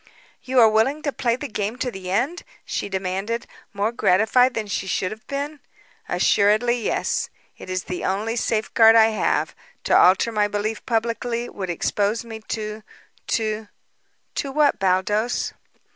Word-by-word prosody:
"You 260 0 +1
are 225 - +8
willing 225 +8 +1
to 285 - 0
play 240 -4 0
the 285 +4 -6
game 215 0 -3
to 250 -1 -2
the 190 -3 -7
end?" 250 - 0 0.2
she - - -3
demanded, 195 +4 -2 0.3
more 205 +2 -1
gratified 235 +4 +3
than 220 - -2
she 195 -1 -3
should 185 0 -1
have 220 0 -10
been. 285 +2 -4 0.5
"Assuredly, 215 +4 +3
yes. - - -1 0.3
It - - -10
is 185 -1 -2
the 180 - -5
only 210 +4 -1
safeguard 225 0 +4
I 225 -1 +7
have. 215 - 0 0.3
To - - +2
alter 190 +5 +5
my 210 -2 +2
belief 210 +2 -3
publicly 235 +1 -1
would 190 -2 -6
expose 205 +6 -1
me 225 -1 -8
to 215 -1 -4 0.5
to 215 -1 -1 0.3
" - - -45
"To 275 - -2
what, 290 0 +2
Baldos?" 195 +5 0
220 Hz, 160 wpm, -23 LUFS, 200-240 Hz, 0.5 s, are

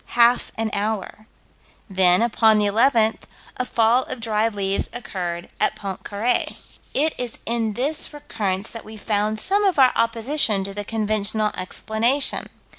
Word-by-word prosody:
Half 240 +1 +4
an 225 -1 -1
hour. 215 +1 -3 0.6
Then, 185 0 +3
upon 220 -2 +4
the 210 - +2
11th, 225 +1 +3 0.4
a 255 - -1
fall 235 +1 +3
of 255 - -4
dried 225 -1 0
leaves 195 -1 0
occurred 175 -7 -5
at - - +1
Pontcarré. 200 +4 -2 0.3
It 305 +3 +1
is 245 -2 -4
in 225 -2 -1
this 285 +8 -1
recurrence 205 -9 -2
that 230 - -8
we 220 0 -11
found 210 0 -1
some 400 - +1
of 385 -5 +2
our 260 -2 +6
opposition 230 -2 +1
to 195 0 -5
the 205 +1 -4
conventional 215 0 -1
explanation. 225 +8 0
220 Hz, 145 wpm, -22 LUFS, 205-240 Hz, 0.6 s, our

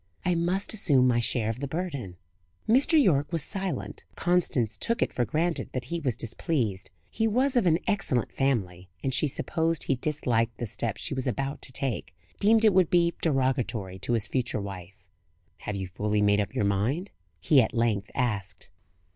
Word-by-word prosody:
I 180 - +3
must 175 +5 0
assume 145 -11 +3
my 120 -1 +3
share 115 -1 0
of 115 +2 -3
the 140 - -3
burden." 140 - -4 0.5
Mr. 280 +8 +4
Yorke 150 - +3
was 165 -4 0
silent. 195 0 -4
Constance 145 - +1
took 230 - 0
it - - -3
for 120 - 0
granted 165 +5 -1
that 130 -1 -3
he 170 - 0
was 130 -8 -1
displeased. 115 - -2 0.2
He 225 - +1
was 255 +5 +1
of 235 -7 +3
an 165 -1 +4
excellent 130 - +1
family, 95 -10 -1
and 135 - -1
she 135 +4 +2
supposed 160 +2 -1
he - - +1
disliked 120 -4 -1
the 120 - -3
step 110 0 -3
she - - -3
was 130 0 -2
about 135 +3 -2
to - - -2
take 120 - -3 0.2
deemed 220 +2 +4
it 215 - +6
would 180 -3 +4
be 170 -1 +3
derogatory 130 - 0
to 120 - -1
his 115 -1 0
future 125 -4 -1
wife. 100 0 -9 0.6
"Have 105 - -2
you 95 -1 -4
fully 105 +3 0
made 100 0 +4
up 100 - -5
your 105 - +1
mind?" 115 - 0 0.3
he 135 - +5
at 110 - 0
length 110 -4 0
asked. 100 -8 -2
130 Hz, 185 wpm, -27 LUFS, 105-170 Hz, 0.6 s, it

